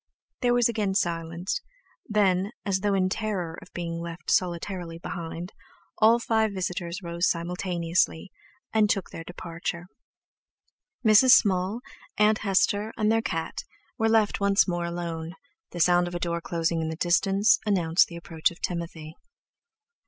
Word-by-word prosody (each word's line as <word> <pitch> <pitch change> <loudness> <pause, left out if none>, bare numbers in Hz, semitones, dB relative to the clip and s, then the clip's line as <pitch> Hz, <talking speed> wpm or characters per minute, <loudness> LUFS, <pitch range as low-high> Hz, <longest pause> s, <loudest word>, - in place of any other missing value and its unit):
There 245 -1 +3
was 245 -1 +4
again 210 -4 -1
silence; 170 0 -1 0.5
then, 200 -2 +2
as 195 -2 +1
though 200 0 +1
in 185 -1 +2
terror 185 -5 -3
of - - -15
being 170 -1 -4
left 170 0 -5
solitarily 175 -1 -1
behind, 170 +1 -6 0.5
all 225 +2 +6
five 220 -3 +1
visitors 180 0 -4
rose 170 +1 0
simultaneously, 170 0 -1 0.4
and 215 -2 +3
took 195 -3 -1
their 165 - -7
departure. 170 0 -6 1.2
Mrs. 220 +4 +7
Small, 195 +3 +3 0.4
Aunt 215 0 +4
Hester, 205 +2 +1
and 215 0 +2
their 225 0 +2
cat 165 -7 -3 0.4
were 225 0 +2
left 220 -2 +2
once 200 0 +3
more 175 -1 -1
alone, 170 -1 -5 0.3
the 175 - -8
sound 175 +1 +4
of 175 - -6
a - - -2
door 170 -1 -2
closing 165 -1 -1
in 160 - -2
the 160 - -4
distance 195 +5 +3
announced 180 -5 +3
the 170 - -10
approach 165 -1 -1
of 170 - -14
Timothy. 165 -3 -5
180 Hz, 145 wpm, -26 LUFS, 170-205 Hz, 1.2 s, Mrs